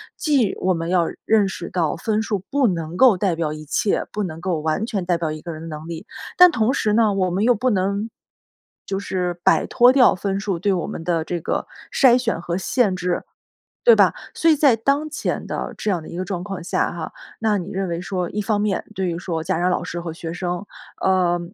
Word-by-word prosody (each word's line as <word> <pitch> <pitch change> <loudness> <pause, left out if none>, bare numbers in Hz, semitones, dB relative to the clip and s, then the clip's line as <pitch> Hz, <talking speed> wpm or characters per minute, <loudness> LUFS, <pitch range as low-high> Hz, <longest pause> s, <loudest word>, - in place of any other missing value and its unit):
既 275 - +1
我 185 0 +2
们 165 -1 -3
要 175 -2 +2 0.2
认 215 -3 +4
识 175 -2 -6
到 165 -5 0
分 215 +4 0
数 215 -2 -1
不 280 -2 +2
能 165 -3 -3
够 245 -5 +6
代 185 -2 +1
表 160 -2 -1
一 155 0 -9
切， 195 +7 0
不 210 - -1
能 160 -4 -5
够 175 -2 -1
完 160 +7 0
全 205 -6 -3
代 175 -1 +1
表 165 -2 -2
一 155 0 -6
个 170 - -6
人 155 -1 -8
的 - - -7
能 155 0 -7
力， 165 -1 -7 0.3
但 360 -1 +9
同 230 -1 +1
时 210 -6 +1
呢， 215 -2 +3
我 190 -2 +1
们 190 +4 0
又 245 +2 +5
不 255 +5 0
能， 200 +1 0 0.8
就 195 0 -2
是 180 -3 -3
摆 190 - +4
脱 245 +1 +5
掉 260 -1 +6
分 195 +1 -2
数， 200 -3 -2
对 200 +3 +1
我 175 -4 -2
们 - - -6
的 165 -2 0
这 175 +1 -3
个 - - -2 0.2
筛 250 -3 +5
选 245 -2 -1
和 175 0 -2
限 200 +1 +1
制， 180 -1 -2 0.6
对 480 -1 +8
吧。 - - +4 0.2
所 330 - +3
以 310 - +5
在 280 -4 +5
当 280 +7 0
前 - - -3
的 - - -4
这 215 - -1
样 175 -4 -1
的 - - -11
一 - - -7
个 185 - -2
状 185 -2 -4
况 195 -3 -6
下 - - 0
哈， 165 -2 -6 0.3
那 215 -2 +1
你 185 +1 -6
认 195 -1 -2
为 170 0 -3
说， 180 -1 -3
一 210 - -2
方 205 0 0
面 205 -2 0
对 190 -2 -1
于 170 -1 -2
说 165 -3 -3
家 185 0 0
长 180 +1 +2
老 180 - -1
师 175 - -5
和 170 -1 -5
学 165 0 -6
生， 180 +2 -3 0.4
呃， 180 -2 +2
190 Hz, 255 characters per minute, -22 LUFS, 170-215 Hz, 0.8 s, 但